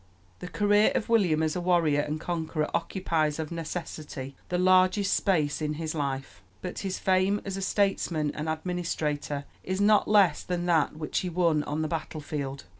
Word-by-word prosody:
The - - -6
career 205 +5 +3
of 240 -4 -1
William 180 -9 +3
as 155 -1 0
a 180 - -2
warrior 170 -5 +3
and 150 +1 -3
conqueror 160 -2 -2
occupies 160 -6 0
of 160 -1 -4
necessity 155 -5 -6
the 180 - 0
largest 185 +2 +4
space 155 -7 +1
in 150 0 -1
his 160 0 -3
life; 135 -8 -4 0.2
but - - -4
his 190 -1 -3
fame 190 +2 +2
as 195 -1 -3
a 195 - -4
statesman 185 -6 0
and 155 +1 -4
administrator 155 -4 -2 0.2
is 185 +1 -2
not 205 +1 +4
less 200 -7 +4
than 175 -1 -3
that 165 -5 +2
which 155 -1 -2
he 185 - -3
won 165 -3 +2
on 155 +2 -2
the - - -1
battle 155 0 -4
field. 140 -2 -5
165 Hz, 180 wpm, -28 LUFS, 150-185 Hz, 0.2 s, largest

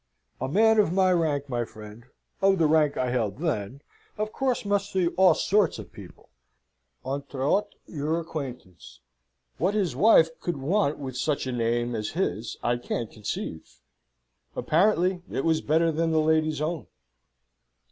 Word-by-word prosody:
"A 130 - -2
man 220 +8 +4
of 200 -5 +3
my 185 0 +3
rank, 150 -5 0
my 120 -3 -1
friend 110 0 -12 0.4
of 195 0 +4
the 165 - +3
rank 150 -1 +3
I 125 -1 0
held 115 -5 -1
then 140 - -3 0.3
of 215 +1 -2
course, 255 -4 -1
must 200 0 0
see 185 -3 +1
all 185 -2 +4
sorts 205 0 +2
of - - -10
people - - -13 0.8
entre 140 0 -4
autres 205 +5 +1
your 155 +1 -2
acquaintance. 125 - -8 0.6
What 190 +5 +1
his 185 -11 0
wife 165 - +6
could 175 -4 -3
want 150 +2 0
with 130 -3 -6
such 145 +2 -1
a 130 - -3
name 120 0 0
as 105 -2 -3
his 115 - -2
I 120 0 +1
can't 120 -2 -4
conceive." 100 -6 -6 0.8
"Apparently, 180 +1 +2
it 135 - -2
was 160 -1 +2
better 165 +2 +2
than 165 +1 0
the 160 -1 +2
lady's 155 -1 +1
own." 160 +1 -3
155 Hz, 155 wpm, -26 LUFS, 125-180 Hz, 0.8 s, wife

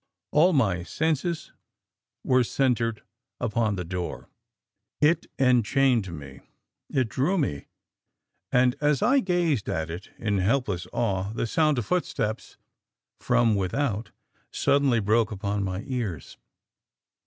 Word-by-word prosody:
"All 165 +5 +5
my 105 - +2
senses 160 - -2 0.7
were 130 0 +3
centred 120 -3 0 0.4
upon 110 -1 0
the 90 -2 -4
door; 90 +1 -5 0.7
it 155 +3 +3
enchained, 125 -2 +3 0.8
it 130 -3 +1
drew 150 - 0
me, 105 - -2 0.8
and 125 0 +3
as 150 +2 +2
I 260 +5 +4
gazed 175 - 0
at 80 0 -2
it 90 +4 -8
in 105 -3 0
helpless 105 -3 0
awe 100 -3 -1
the - - -1
sound 155 +4 +2
of 120 - -1
footsteps 120 -11 -2 0.6
from 120 -2 +3
without 105 +3 -1 0.4
suddenly 140 -4 +2
broke 110 +2 +2
upon 100 0 -2
my 95 +1 -3
ears. 115 - -4
120 Hz, 115 wpm, -26 LUFS, 100-140 Hz, 0.8 s, All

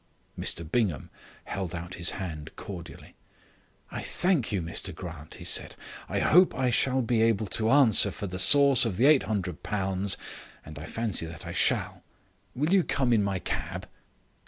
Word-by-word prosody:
Mr 85 - -2
Bingham 90 - -1 0.3
held 95 -3 -5
out 85 +1 -7
his 85 0 +2
hand 80 -6 -6
cordially. 90 -4 -10 0.8
"I - - -5
thank 175 -11 +1
you, 100 - 0
Mr 85 -1 -3
Grant," 80 -4 -9
he - - -10
said. - - -2 0.3
"I - - -2
hope 180 +3 +4
I 130 -2 0
shall 130 +2 +1
be 115 -1 +1
able 110 -2 +2
to 110 +2 0
answer 120 -7 +6
for 100 - -6
the 90 -1 -6
source 140 +3 +6
of 110 -7 -2
the 120 - +1
£800 95 - 0 0.5
and 75 -1 -10
I 75 - -8
fancy 110 -7 -1
that 85 0 -10
I - - -6
shall. - - 0 0.5
Will 150 +7 0
you 190 -2 +4
come 130 -6 0
in 105 -3 +3
my 100 -1 -1
cab?" - - -5
100 Hz, 165 wpm, -27 LUFS, 90-125 Hz, 0.8 s, answer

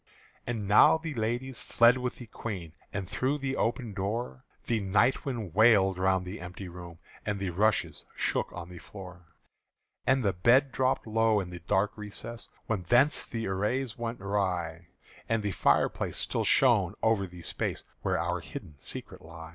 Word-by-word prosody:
And 110 -4 -3
now 105 +9 +7
the 160 -1 -5
ladies 120 +2 -2
fled 120 +1 +5
with 125 -1 -3
the 120 - -10
Queen; 95 -8 -6 0.2
And 95 -2 -4
through 130 +7 0
the 135 -2 -2
open 115 -2 -1
door 100 - -3 0.2
The 115 -2 +1
night 105 +6 +2
wind 115 - -4
wailed 100 -3 +5
round 95 0 +2
the 90 +2 -7
empty 90 +2 -7
room 85 -1 -10 0.3
And 105 -1 -2
the 95 -2 -2
rushes 105 +4 +1
shook - - 0
on 90 0 -8
the 90 -1 -10
floor. 90 -2 -12 0.7
And 130 0 +3
the 100 - +2
bed 125 +9 +4
drooped 130 0 +1
low 110 -1 +2
in 90 -2 -5
the 90 - -7
dark 95 +4 0
recess 105 +2 -7 0.2
Whence 120 - +2
the 115 -1 -4
arras 105 +6 -1
was 115 0 -3
rent - - -18
away; 90 -4 -1 0.4
And 115 -2 +1
the 100 - -1
firelight - - +1
still - - -1
shone - - +4
over 110 -4 +2
the 90 -1 -12
space - - -3 0.2
Where - - 0
our - - -1
hidden 75 -3 -9
secret - - -5
lay. 80 0 -10
105 Hz, 170 wpm, -29 LUFS, 90-120 Hz, 0.7 s, now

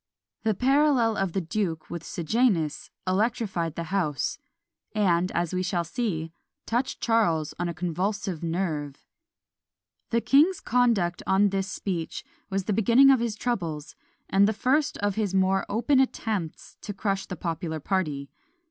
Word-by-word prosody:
The 220 -2 +1
parallel 265 -2 +3
of 195 -4 -1
the 195 - 0
duke 170 -2 -3
with 170 -2 -5
Sejanus 170 - 0 0.2
electrified 190 -4 0
the 170 - -3
house; 155 -9 -1 0.6
and, 185 -3 +2
as 175 0 -1
we 185 - 0
shall 180 -1 0
see, 165 -4 -3 0.3
touched 245 +3 -1
Charles 170 -10 +2
on 175 0 -1
a - - -3
convulsive 180 +1 -2
nerve. 165 -5 -3 1.0
The 230 - +2
king's 300 +10 +4
conduct 225 -8 +1
on 200 +2 +4
this 195 0 -1
speech 180 -4 -4 0.2
was 195 0 -1
the 210 - -1
beginning 240 +6 +6
of 265 - +4
his 230 -2 -1
troubles, 170 -11 -3 0.3
and 200 +1 +4
the 220 - +1
first 280 +7 +1
of 205 0 0
his 200 -2 -1
more 190 0 +2
open 240 +6 +2
attempts 215 -10 -2
to 205 - -6
crush 195 -1 -1
the 185 - -5
popular 165 -1 -3
party. 150 -5 -2
195 Hz, 150 wpm, -26 LUFS, 170-225 Hz, 1.0 s, beginning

